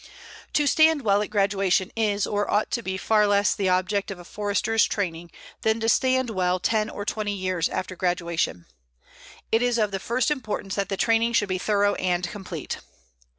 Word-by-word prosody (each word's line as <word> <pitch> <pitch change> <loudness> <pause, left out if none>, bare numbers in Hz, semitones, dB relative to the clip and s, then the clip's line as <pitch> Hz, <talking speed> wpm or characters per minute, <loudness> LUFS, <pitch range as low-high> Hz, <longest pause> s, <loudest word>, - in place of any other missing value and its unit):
To 295 - +2
stand 315 0 +4
well 200 -1 +3
at 210 - -3
graduation 195 -3 +1
is 210 -3 +1
or 205 0 -1
ought 210 - +1
to 235 - -1
be 190 -3 -3
far 210 +2 +3
less 205 0 +3
the 195 -2 -1
object 185 +3 0
of 195 - -5
a 175 - -11
Forester's 210 +3 0
training 175 -4 -3 0.3
than 220 +1 +1
to 225 - -1
stand 260 0 +2
well 185 -2 0
ten 215 +2 0
or 205 - -6
twenty 210 -1 -2
years 185 -3 -1
after 185 0 -4
graduation. 170 - -1 0.9
It 225 - +3
is 245 -1 +1
of 210 -2 +1
the 195 - -3
first 250 +8 0
importance 210 -8 -3
that 200 -1 -2
the 195 - -2
training 230 +2 +2
should 205 -3 +2
be 185 0 -1
thorough 205 0 +2
and 180 -1 -1
complete. 180 -6 -6
205 Hz, 190 wpm, -25 LUFS, 185-225 Hz, 0.9 s, stand